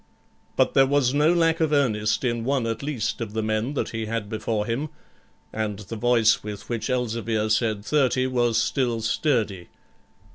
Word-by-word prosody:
But - - +2
there 135 0 +5
was 140 -2 +2
no 150 +3 +4
lack 165 -1 +2
of 160 -2 +1
earnest 110 -7 +1
in 120 -2 -1
one 135 -1 0
at 115 -1 -3
least 140 -6 -3
of 110 -2 -5
the 110 0 -1
men 110 +6 -1
that - - -1
he 110 -1 -4
had 110 -2 -3
before 110 -1 -2
him, 130 +7 -2 0.6
and 110 -2 -2
the 105 +2 -8
voice 115 -1 +3
with 105 -1 -8
which 115 -1 -3
Elzevir 115 -3 -1
said 110 -2 0
30 130 -3 +2
was 120 -3 +1
still 120 -1 0
sturdy. 110 - -1
115 Hz, 175 wpm, -24 LUFS, 110-135 Hz, 0.6 s, there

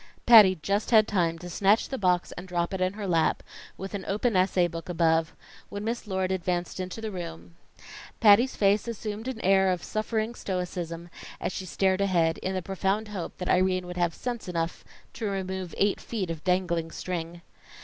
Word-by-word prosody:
Patty 215 -6 +9
just 200 +4 0
had 220 -3 +6
time 170 -5 +1
to 175 +2 -9
snatch 200 +5 +2
the 265 - -3
box 180 -3 +1
and 180 - -8
drop 175 0 -1
it 190 - -3
in 185 +1 +1
her 205 0 -5
lap, 165 -3 +1 0.3
with 195 +2 -7
an 200 -2 -4
open 215 +3 0
essay 185 -1 +3
book 165 +1 -8
above, 165 -1 +1 0.3
when 205 0 -5
Miss 230 0 -3
Lord 190 -1 -1
advanced 180 -1 -2
into 185 +4 -5
the 220 -1 -4
room. 85 - -7 0.7
Patty's 230 +4 +6
face 200 +2 +2
assumed 220 0 -5
an 260 -4 -4
air 190 0 +4
of 180 -1 -1
suffering 220 +1 -2
stoicism, 175 -4 -4 0.3
as - - -2
she 185 0 -6
stared 190 +1 +1
ahead, 170 -4 +2
in 190 0 -3
the 185 - -2
profound 195 +4 -1
hope 195 -5 -6
that 180 - -5
Irene 185 0 +2
would 180 0 -7
have 175 -2 0
sense 240 -4 -5
enough 165 -1 -3 0.3
to 220 - -3
remove 190 -2 -4
eight 200 0 +1
feet 195 -7 -3
of 165 -2 -7
dangling 180 -3 0
string. 170 0 -5
185 Hz, 190 wpm, -27 LUFS, 175-205 Hz, 0.7 s, Patty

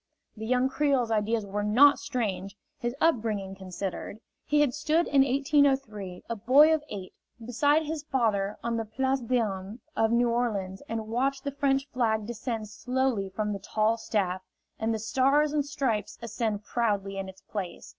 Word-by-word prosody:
The 220 0 -6
young 250 +1 +3
Creole's 270 -4 +1
ideas 220 0 +1
were 200 +1 -3
not 250 +8 +6
strange, 200 -8 -3 0.2
his 240 +1 -2
upbringing 215 -11 +1
considered. 190 +2 -6 0.3
He 295 0 +3
had 280 -4 +2
stood 310 +3 +1
in 280 -1 +4
1803, 270 -8 +1
a 230 - -2
boy 270 +9 +6
of 310 -1 0
eight, 190 -3 -7 0.3
beside 285 +6 +2
his 310 0 -3
father 220 -8 0
on 235 0 -1
the 225 - -2
Place 265 +5 0
d'Armes 220 -4 -2 0.2
of 225 0 +2
New 240 0 +3
Orleans 200 -6 -1
and 225 -1 -3
watched 265 +4 0
the 280 - -2
French 275 0 +1
flag 220 -4 +1
descend 225 -1 -4
slowly 250 -2 -1
from 210 +2 -2
the 200 - -4
tall 215 +3 +1
staff, 195 -5 -1 0.4
and 220 +1 0
the 220 - 0
Stars 270 +7 +2
and 295 -1 +2
Stripes 265 -8 -2
ascend 220 -2 -2
proudly 205 -4 -1
in 190 0 -5
its 190 - -13
place. 190 -5 -6
230 Hz, 165 wpm, -28 LUFS, 205-270 Hz, 0.4 s, not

